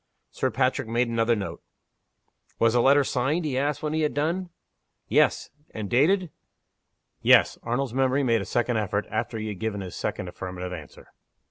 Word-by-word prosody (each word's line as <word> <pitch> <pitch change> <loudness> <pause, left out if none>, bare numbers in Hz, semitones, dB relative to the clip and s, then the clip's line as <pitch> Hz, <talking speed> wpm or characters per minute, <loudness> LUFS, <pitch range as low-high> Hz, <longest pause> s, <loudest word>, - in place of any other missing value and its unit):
Sir - - -1
Patrick - - 0
made 120 +2 0
another 115 0 +2
note. 100 -3 -5 1.0
"Was 115 -1 +3
the 120 - +4
letter 140 +3 +5
signed?" 140 +7 0
he 140 -4 -1
asked, 145 +2 -1
when 155 0 -1
he 160 - 0
had 150 -4 0
done. 170 +5 -1 0.6
"Yes." - - +2 0.2
"And 105 -2 -5
dated?" 170 +7 +3 0.9
"Yes." - - +5
Arnold's 120 +1 -2
memory 135 +1 +2
made 115 -4 +2
a - - -5
second 120 -1 0
effort, 105 -1 -1
after 110 +1 -2
he 110 0 -4
had 100 -3 -6
given 110 -2 -2
his 90 -2 -7
second 90 - -3
affirmative 90 0 -6
answer. 80 -5 -11
120 Hz, 170 wpm, -26 LUFS, 110-145 Hz, 1.0 s, letter